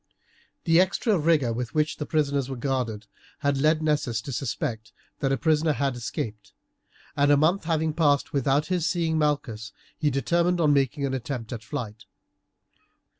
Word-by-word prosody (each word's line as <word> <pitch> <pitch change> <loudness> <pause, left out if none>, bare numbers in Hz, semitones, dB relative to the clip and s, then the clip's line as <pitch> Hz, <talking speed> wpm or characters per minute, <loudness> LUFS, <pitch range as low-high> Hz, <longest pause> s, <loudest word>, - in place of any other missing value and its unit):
The 165 -1 +4
extra 200 +3 +1
rigour 150 -7 +2
with 125 +3 -4
which 155 0 +1
the 150 - -5
prisoners 140 -4 0
were 135 - -4
guarded 120 -4 -2 0.4
had 140 -2 +1
led 155 +1 +3
Nessus 145 -7 0
to 135 - -7
suspect 115 -3 -3 0.3
that 135 - 0
a 135 - +2
prisoner 155 +1 +2
had 140 -3 -1
escaped, 105 -4 -5 0.6
and 145 0 +3
a 145 - +6
month 165 +5 +2
having 160 -1 0
passed 145 -3 +2
without 140 +2 +2
his 180 -3 0
seeing 165 -2 0
Malchus, 120 -8 -1 0.2
he 155 -2 +1
determined 170 +6 +1
on 150 -3 +4
making 140 +1 +1
an 135 - -2
attempt 125 -2 -4
at 115 -2 -7
flight. 115 -8 -6
145 Hz, 165 wpm, -26 LUFS, 125-155 Hz, 0.6 s, a